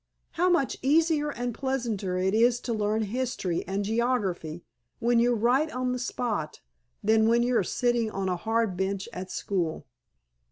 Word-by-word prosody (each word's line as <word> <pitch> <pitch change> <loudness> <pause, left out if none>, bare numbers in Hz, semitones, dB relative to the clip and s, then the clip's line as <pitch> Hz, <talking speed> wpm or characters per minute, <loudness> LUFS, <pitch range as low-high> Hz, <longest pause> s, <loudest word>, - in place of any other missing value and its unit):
How 360 +2 +2
much 340 -7 +1
easier 305 +1 +3
and 245 -3 -3
pleasanter 230 -8 -2
it 190 +1 +1
is 235 +2 +4
to 235 - -2
learn 215 0 0
history 215 -6 -2
and 195 +2 -1
geography 200 -8 -1 0.3
when 240 0 +2
you're 240 +1 +3
right 250 +8 +2
on 255 0 -1
the 250 - -2
spot 220 -10 -3 0.4
than 220 0 +4
when 235 +1 +4
you 245 0 +1
are 205 - +3
sitting 240 +3 0
on 195 -2 -3
a 180 - 0
hard 225 +1 0
bench 190 +2 -2
at 185 -2 -6
school!" 170 -7 -2
230 Hz, 165 wpm, -27 LUFS, 195-250 Hz, 0.4 s, is